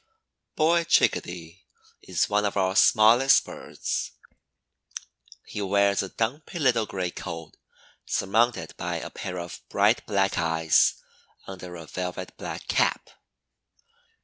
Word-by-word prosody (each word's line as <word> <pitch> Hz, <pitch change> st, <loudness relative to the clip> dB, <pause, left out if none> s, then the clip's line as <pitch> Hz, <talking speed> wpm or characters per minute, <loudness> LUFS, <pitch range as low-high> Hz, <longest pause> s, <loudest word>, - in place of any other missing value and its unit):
Boy 170 Hz, +2 st, +3 dB
Chickadee 85 Hz, -, 0 dB, 0.4 s
is -, -, 0 dB
one 105 Hz, 0 st, +1 dB
of 100 Hz, -1 st, -1 dB
our 95 Hz, 0 st, +1 dB
smallest 115 Hz, +6 st, +5 dB
birds. -, -, -5 dB, 1.3 s
He 105 Hz, -, -6 dB
wears 100 Hz, 0 st, +2 dB
a 95 Hz, -, -5 dB
dumpy 135 Hz, -, -3 dB
little 125 Hz, -8 st, +2 dB
gray 90 Hz, -2 st, -3 dB
coat 85 Hz, -3 st, -7 dB, 0.6 s
surmounted 115 Hz, +5 st, 0 dB
by -, -, -3 dB
a -, -, -6 dB
pair 90 Hz, -, -6 dB
of 85 Hz, 0 st, -7 dB
bright -, -, +2 dB
black 100 Hz, -1 st, +1 dB
eyes 80 Hz, -1 st, +3 dB, 0.5 s
under 90 Hz, -2 st, -9 dB
a 85 Hz, -1 st, -9 dB
velvety 90 Hz, +2 st, -5 dB
black -, -, -7 dB
cap. -, -, 0 dB
95 Hz, 120 wpm, -26 LUFS, 90-110 Hz, 1.3 s, smallest